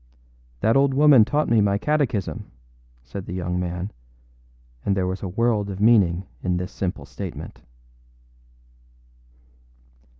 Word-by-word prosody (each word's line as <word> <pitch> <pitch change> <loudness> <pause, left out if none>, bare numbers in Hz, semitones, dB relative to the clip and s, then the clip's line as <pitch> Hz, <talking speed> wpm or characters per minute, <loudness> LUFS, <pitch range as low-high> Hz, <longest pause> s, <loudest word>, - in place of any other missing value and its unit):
âThat 110 +2 +3
old 135 0 +4
woman 145 -5 +7
taught 150 +7 0
me 115 -2 +4
my 100 0 +2
catechism,â 135 -6 -1 0.5
said 75 +11 -8
the 90 - -5
young 90 0 -2
man; 90 +2 -3 0.9
and 100 -1 0
there 95 - +1
was 95 +1 -3
a 100 - -3
world 105 +1 0
of 95 -1 -6
meaning 100 -5 +4 0.2
in 90 -1 0
this 90 +2 -4
simple 90 -2 -4
comment. - - -7
100 Hz, 130 wpm, -23 LUFS, 90-115 Hz, 0.9 s, woman